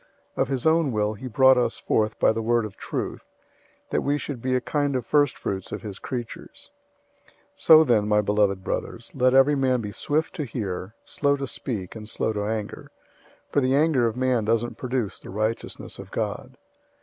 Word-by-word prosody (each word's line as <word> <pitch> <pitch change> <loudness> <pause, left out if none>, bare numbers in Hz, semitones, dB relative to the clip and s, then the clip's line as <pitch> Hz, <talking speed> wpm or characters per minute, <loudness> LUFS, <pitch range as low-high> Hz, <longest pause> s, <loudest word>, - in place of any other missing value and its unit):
001:018 - - -1
Of 135 - +2
his 130 -2 -3
own 160 -3 +3
will 105 -1 0
he 120 +5 -8
brought 130 +2 +5
us 125 - 0
forth 110 -1 0
by - - +4
the 110 0 -2
word 115 0 +1
of 105 - -8
truth, - - -5 0.6
that - - +1
we 145 +1 +1
should 140 -4 -6
be 130 +1 0
a - - +3
kind 145 +1 -1
of 125 - -2
first 145 -3 +2
fruits 95 -1 -4
of - - -5
his 105 -2 -7
creatures. 120 -3 -7 0.6
001:019 - - -26 0.2
So, 160 0 +7
then, 110 -7 +2
my 105 0 +3
beloved 105 -2 +1
brothers, - - -4
let 130 0 +3
every 135 +2 +6
man 130 -3 +2
be 105 -3 -5
swift 155 +9 -1
to 150 - -1
hear, 105 -5 -5
slow 140 -1 0
to 140 - -3
speak, 110 -8 -5
and 105 -1 -8
slow 110 - -1
to 105 -1 -2
anger; 110 -1 -4 0.6
001:020 - - -37
for 145 - +2
the 130 +1 +2
anger 145 -5 +3
of 115 +1 -3
man 130 -3 +1
doesn't 115 +2 0
produce 125 -7 -2
the - - -12
righteousness 110 +3 -3
of - - -9
God. - - -4
120 Hz, 205 wpm, -25 LUFS, 105-135 Hz, 0.6 s, So